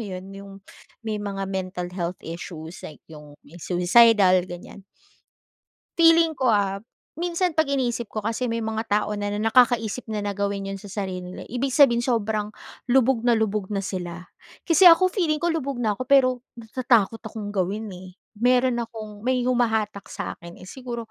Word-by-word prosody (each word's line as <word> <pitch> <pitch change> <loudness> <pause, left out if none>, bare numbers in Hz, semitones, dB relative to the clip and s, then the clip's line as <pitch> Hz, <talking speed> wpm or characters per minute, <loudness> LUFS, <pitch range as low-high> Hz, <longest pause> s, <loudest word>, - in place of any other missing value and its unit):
yun, 185 -2 -7
yung 195 0 -10 0.5
may 215 -2 -3
mga 195 -1 -4
mental 185 -2 -4
health 175 -1 -3
issues 165 0 -8
like, 150 - -11
yung 150 -2 -13
may 165 +4 -14
suicidal 185 +1 +5
ganyan. 175 +2 -10 1.1
Feeling 330 -1 +5
ko 260 - 0
ah, 200 -2 +1 0.4
minsan 350 +1 0
pag 315 - +4
iniisip 245 -4 -1
ko 215 - -5
kasi 230 +3 -1
may 230 -1 -2
mga 220 0 -2
tao 210 0 0
na 205 0 -2
nakakaisip 225 +1 +2
na 215 -2 -3
na 205 - -2
gawin 200 0 -3
yun 195 - -6
sa - - -11
sarili 190 -2 -4
nila 180 - -8
ibig 255 +1 -2
sabihin 255 -6 +5
sobrang 220 -4 -1 0.4
lubog 255 -1 +3
na 240 - +5
lubog 215 -2 -1
na 195 - -1
sila. 180 -1 -6 0.3
Kasi 340 +2 +5
ako 360 +2 +7
feeling 330 -5 -1
ko 345 - +2
lubog 275 -6 -3
na 215 -2 +1
ako, - - -2
pero 270 -2 +5 0.3
natatakot 230 -2 +1
akong 220 -2 -7
gawin, 205 +2 -2
eh. 185 0 -10 0.3
Meron 250 0 +3
akong 220 -3 -7
may 255 -1 +1
humahatak 225 -5 0
sa'kin 170 0 -7
eh, 185 - -11
siguro 240 -3 -7
220 Hz, 170 wpm, -24 LUFS, 195-250 Hz, 1.1 s, ako